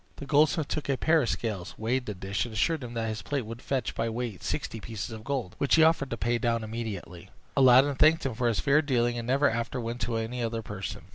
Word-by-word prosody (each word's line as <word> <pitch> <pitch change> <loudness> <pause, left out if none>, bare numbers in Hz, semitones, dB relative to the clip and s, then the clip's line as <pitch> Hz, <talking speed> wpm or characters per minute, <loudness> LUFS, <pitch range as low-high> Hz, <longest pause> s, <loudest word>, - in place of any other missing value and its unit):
The 140 - -8
goldsmith 150 +1 +3
took 150 - -3
a 135 - +2
pair 160 +3 +3
of 120 - -1
scales, 105 -6 -3
weighed 120 +3 -1
the 105 - -4
dish, 95 +2 -2
and 120 - -7
assured 155 +6 +1
him 120 -1 -7
that 115 -1 -1
his 110 0 -3
plate 140 -5 -2
would 115 +2 -8
fetch 135 -2 -2
by 115 0 -1
weight 115 -4 -4
sixty 115 - -3
pieces 110 0 -6
of 110 -1 -8
gold, 130 -8 -3
which 140 - +3
he 160 - +6
offered 160 -4 +3
to 115 - -3
pay 120 +1 0
down 115 0 0
immediately. 110 -6 -6 0.3
Aladdin 130 +2 +6
thanked 155 +3 +4
him 130 - -1
for 120 +2 0
his 115 -3 +1
fair 145 +2 +4
dealing, 120 -5 +1
and 115 - -6
never 140 +3 +3
after 115 +1 -2
went 120 +1 -4
to 115 +2 -1
any 115 +2 -3
other 115 -1 -2
person. 100 -2 -6
120 Hz, 250 wpm, -28 LUFS, 110-140 Hz, 0.3 s, he